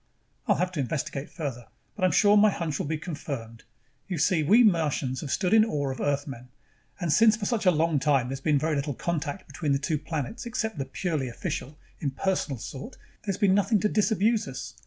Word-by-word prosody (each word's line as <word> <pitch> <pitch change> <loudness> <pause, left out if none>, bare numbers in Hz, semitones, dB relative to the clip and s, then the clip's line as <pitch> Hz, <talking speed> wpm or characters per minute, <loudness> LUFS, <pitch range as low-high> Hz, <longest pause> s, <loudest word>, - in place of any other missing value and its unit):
"I'll - - +4
have 180 +1 0
to 170 - -5
investigate 145 +1 -3
further, 135 -8 -5 0.3
but 205 - -5
I'm 185 - +4
sure 205 0 +5
my 210 +1 +6
hunch 165 -7 -3
will - - -2
be 160 +1 -1
confirmed. 140 -9 -6 0.4
You 180 - -3
see, 165 +1 +2
we 215 +11 +6
Martians 150 - +1
have 150 - -6
stood 185 +7 +1
in 220 -1 +7
awe 145 -11 -1
of 130 - -6
Earthmen. 140 -3 -2 0.5
And 170 -5 0
since 225 -1 +6
for 210 -2 +1
a - - +5
long 160 -2 +2
time 135 -3 +2
there's 135 0 -5
been 150 0 +2
very 155 +2 0
little 140 -1 -2
contact 170 +3 -3
between 150 -4 -2
the - - +3
two 145 +2 -1
planets 160 - -4
except 220 - -3
the 135 - -1
purely 145 -2 -2
official, 130 +4 -5 0.2
impersonal 150 0 -1
sort, 135 - -8 0.3
there's 195 -3 -1
been 195 -2 +3
nothing 205 +2 +3
to 210 - +3
disabuse 215 0 +2
us. 125 -3 -7
155 Hz, 200 wpm, -27 LUFS, 140-195 Hz, 0.5 s, in